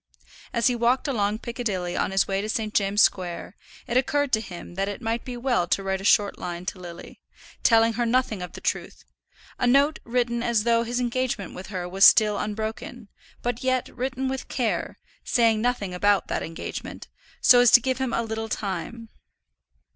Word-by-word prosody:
As 235 - 0
he 250 - +3
walked 240 +4 +1
along 210 -5 0
Piccadilly 220 -7 -3
on - - 0
his 195 0 +1
way 195 0 -1
to 215 - -5
St. 215 -1 -2
James's 200 0 +4
Square, 180 +1 -3 0.3
it 245 -1 0
occurred 285 +1 +1
to 220 - +3
him 180 -4 -9
that 195 +2 -2
it 205 - -6
might 230 0 -2
be 250 -1 -6
well 240 -8 0
to 195 - 0
write 190 0 -2
a - - -9
short 205 0 +3
line 175 0 -5
to 185 - -5
Lily, 175 -1 -11 0.4
telling 225 0 +4
her 240 +1 -1
nothing 230 -5 0
of 180 - -7
the - - -10
truth, - - -3 0.6
a 245 - +2
note 280 +5 +3
written 235 0 -1
as 235 -3 +1
though 230 0 +3
his 240 +1 -2
engagement 245 -6 -2
with 185 - -9
her 185 -3 -4
was 190 +2 0
still 210 -1 +6
unbroken, 220 +1 -5 0.3
but 245 0 -2
yet 255 -1 0
written 260 +1 -2
with 265 0 -4
care, 240 -4 -2 0.3
saying 225 -3 +2
nothing 230 -6 -1
about 205 +2 +2
that - - -1
engagement, 165 - -7 0.3
so 250 -1 +7
as 245 -1 +6
to 245 - +8
give 260 +2 -2
him 260 -2 -1
a 235 - 0
little 225 0 -4
time. 210 +4 -4
225 Hz, 190 wpm, -25 LUFS, 195-245 Hz, 0.6 s, to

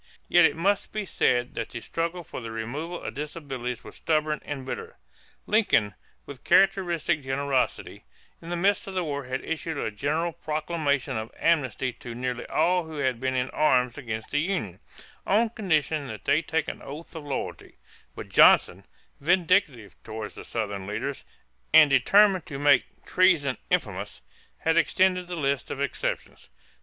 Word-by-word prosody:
Yet 175 -1 +6
it 145 -2 +2
must 195 +5 0
be 215 -1 -3
said 125 -8 +1
that 115 - -4
the 120 - -6
struggle 170 +7 -3
for 145 - -8
the 115 - -6
removal 135 +10 -5
of - - -5
disabilities 135 -5 -5
was - - -12
stubborn 155 -1 0
and 140 -3 -6
bitter. 450 - -6 0.5
Lincoln, 195 - +2 0.3
with 140 -3 -11
characteristic 180 -6 +3
generosity, 135 - -2 0.4
in 165 - -9
the 175 - -1
midst 195 +4 +1
of 195 - -6
the 185 - 0
war 140 -4 -4
had 130 +1 -4
issued 160 -1 -3
a 110 - -2
general 155 +10 -1
proclamation 150 -5 -1
of 110 +1 -4
amnesty 130 -6 +1
to 115 0 -9
nearly 125 0 -3
all 175 +2 +2
who 160 -1 -8
had 130 -4 0
been 130 0 -1
in 130 0 -1
arms 125 -5 +2
against 110 -5 -6
the 145 - +1
Union, 155 - -2 0.5
on 220 +4 +3
condition 155 - 0
that - - -8
they 145 +3 +3
take 160 -1 -1
an - - -6
oath 155 +5 -9
of 160 - -6
loyalty; 140 -2 -5 0.4
but - - -7
Johnson, - - +5 0.3
vindictive 165 - +2
toward 110 -1 -6
Southern 100 -4 -5
leaders 130 +7 -4 0.5
and 155 -2 +8
determined 190 +6 +4
to 140 - -6
make 145 -2 +2
"treason 165 -8 +3
infamous," - - -2 0.4
had 165 0 +2
extended 180 +1 +2
the 180 - -5
list 140 -4 -1
of - - -5
exceptions. 140 - -3
145 Hz, 160 wpm, -26 LUFS, 130-170 Hz, 0.5 s, and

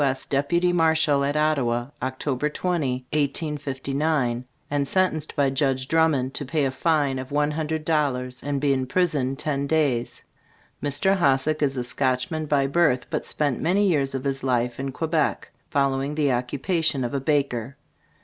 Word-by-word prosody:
S. 135 -1 0
Deputy 170 +6 +1
Marshal 160 -4 +3
at 145 +2 0
Ottawa, 130 -6 +1
Oct. 130 +2 -2
20, 140 -9 -1
1859, 140 -3 -1 0.3
and 145 -1 0
sentenced 160 -2 0
by 140 -3 +2
Judge 135 -1 0
Drummond 150 -5 +2
to - - -4
pay 145 +1 0
a 135 - 0
fine 145 -2 +1
of 130 +1 -7
one 145 +1 +1
hundred 155 0 -3
dollars, 130 -5 0
and 145 -1 -2
be 140 0 +2
imprisoned 135 0 0
ten 140 -1 -1
days. 140 -6 0 0.6
Mr. 145 +7 +2
HOSSACK 150 -1 +2
is 135 -2 +1
a 125 - -1
Scotchman 130 +5 0
by 140 -2 +2
birth, 140 -3 +1
but - - -2
spent 145 -4 0
many 195 +5 +2
years 140 -6 +1
of 130 - -3
his 135 -1 -2
life 125 -2 0
in 135 0 -3
Quebec, 155 +2 -1 0.2
following 140 +1 0
the 145 -3 +2
occupation 140 +4 0
of 120 - -3
a 140 - -1
baker. 140 -3 -1
140 Hz, 160 wpm, -24 LUFS, 130-155 Hz, 0.6 s, Marshal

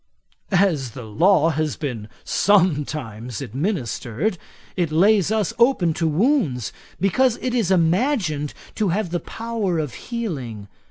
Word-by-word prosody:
'As 175 - +2
the 125 - -7
law 165 - +3
has 155 -1 -1
been 120 -8 -5
sometimes 145 - +1
administered, 145 - -2 0.4
it 175 -4 0
lays 195 +4 +4
us 215 -4 0
open 235 -9 +4
to 165 +1 0
wounds, 160 - +1 0.3
because 235 +6 +2
it 255 - -2
is 230 -7 +1
imagined 175 - +1 0.2
to 210 -3 0
have 180 0 -1
the 175 - 0
power 225 -6 -3
of 150 -6 -2 0.2
healing. 135 - -4
170 Hz, 125 wpm, -22 LUFS, 145-210 Hz, 0.4 s, lays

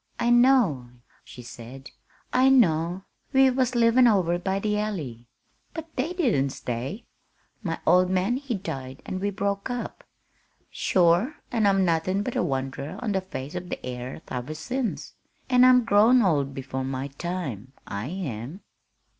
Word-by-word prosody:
"I 240 - +2
know," 240 - +4 0.3
she 125 - -12
said, 120 +3 -11 0.4
"I 260 +1 +5
know. 175 -7 +3 0.3
We 265 0 +6
was 255 -1 0
livin' 240 +1 +5
over 180 -6 +2
by 190 +2 -1
the 210 +1 -1
Alley. 145 - -4 0.5
But 325 0 -8
they 280 +6 -1
didn't 230 - +1
stay. 130 - -5 0.6
My 165 -6 -3
old 180 0 +4
man 190 +6 +1
he 270 -4 -3
died 135 -9 -6
an' 185 - -4
we 200 +2 -1
broke 200 +2 -2
up. 245 -1 -5 0.7
Sure, 180 - +2 0.2
an' 225 -4 +2
I'm 195 -1 +3
nothin' 180 +4 0
but 245 - -4
a - - +2
wanderer 135 +1 -3
on 220 - -1
the 190 -1 0
face 150 -6 -7
of 180 0 -6
the - - -3
airth 125 0 -7
iver 125 +4 -4
since, 245 +9 -4 0.4
an' 250 0 +6
I'm 250 -1 +6
grown 230 +3 +5
old 140 -7 +1
before 130 0 -4
my 135 +1 -4
time, 140 - -5
I 100 +4 -5
am." 150 - -5
185 Hz, 155 wpm, -25 LUFS, -, 0.7 s, We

